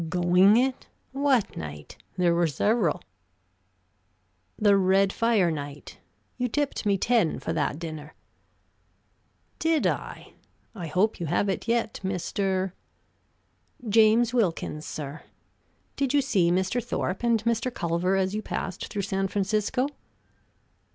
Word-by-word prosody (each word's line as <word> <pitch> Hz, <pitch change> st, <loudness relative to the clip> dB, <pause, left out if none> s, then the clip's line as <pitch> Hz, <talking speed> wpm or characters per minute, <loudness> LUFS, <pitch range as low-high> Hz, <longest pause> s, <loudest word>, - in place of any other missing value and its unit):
"Going 180 Hz, +4 st, +4 dB
it? 260 Hz, +1 st, 0 dB, 0.2 s
What 270 Hz, -4 st, +1 dB
night? 75 Hz, -2 st, -8 dB, 0.2 s
There 175 Hz, -2 st, +3 dB
were 170 Hz, 0 st, +2 dB
several." 185 Hz, -, +1 dB, 1.5 s
"The 205 Hz, -2 st, +4 dB
red 195 Hz, 0 st, +3 dB
fire 220 Hz, -7 st, +2 dB
night. 145 Hz, -1 st, -7 dB, 0.4 s
You 250 Hz, -, 0 dB
tipped 280 Hz, -3 st, -2 dB
me 200 Hz, -1 st, +3 dB
ten 225 Hz, -5 st, +2 dB
for -, -, -3 dB
that -, -, -1 dB
dinner." 155 Hz, -2 st, -7 dB, 1.4 s
"Did 320 Hz, -2 st, +1 dB
I? -, -, -3 dB, 0.4 s
I 180 Hz, -7 st, -6 dB
hope 195 Hz, +7 st, +1 dB
you 170 Hz, -, -3 dB
have 175 Hz, +5 st, +1 dB
it 190 Hz, -, -3 dB
yet, 230 Hz, -1 st, 0 dB
Mr. 190 Hz, 0 st, -1 dB, 0.6 s
" 245 Hz, -, -20 dB
"James 225 Hz, +2 st, +4 dB
Wilkins, 170 Hz, -8 st, -1 dB
sir. 145 Hz, 0 st, -6 dB, 0.7 s
Did 275 Hz, 0 st, 0 dB
you 285 Hz, -, +5 dB
see 190 Hz, -10 st, +2 dB
Mr. 190 Hz, +7 st, 0 dB
Thorpe 190 Hz, -5 st, -3 dB
and 235 Hz, -2 st, +1 dB
Mr. 235 Hz, +2 st, 0 dB
Culver 175 Hz, -1 st, 0 dB
as 190 Hz, 0 st, 0 dB
you 215 Hz, -, -2 dB
passed 190 Hz, -3 st, -4 dB
through 200 Hz, -, -4 dB
San 195 Hz, 0 st, -1 dB
Francisco?" 210 Hz, +6 st, 0 dB
195 Hz, 130 wpm, -26 LUFS, 175-230 Hz, 1.5 s, you